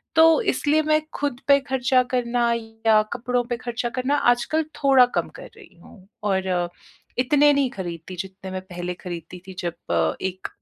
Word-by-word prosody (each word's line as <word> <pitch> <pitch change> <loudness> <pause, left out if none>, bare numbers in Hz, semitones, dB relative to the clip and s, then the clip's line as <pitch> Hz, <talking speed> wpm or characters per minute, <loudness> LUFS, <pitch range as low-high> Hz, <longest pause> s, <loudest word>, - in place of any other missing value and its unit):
तो 325 -1 +6
इसलिए 300 +4 +2
मैं 310 0 +2 0.2
ख़ुद 280 -4 -2
पे 280 0 +6
खर्चा 255 -1 +3
करना 240 -1 +1
या 225 -1 +1
कपड़ों 245 0 -1
पे 240 - -1
खर्चा 240 0 -3
करना 275 +3 +1 0.2
आजकल 310 +7 -1 0.2
थोड़ा 265 -2 +7
कम - - 0
कर - - -10
रही - - -16
हूँ 190 -2 -17 0.3
और 180 -2 0 0.5
इतने 290 +3 +4
नहीं 275 -2 +2
खरीदती 175 -1 -7
जितने 190 0 -7
मैं 185 0 -4
पहले 180 -1 -5
खरीदती 175 0 -8
थी 190 - -8
जब 85 - -1
एक 190 0 -4
235 Hz, 165 wpm, -23 LUFS, 185-265 Hz, 0.5 s, थोड़ा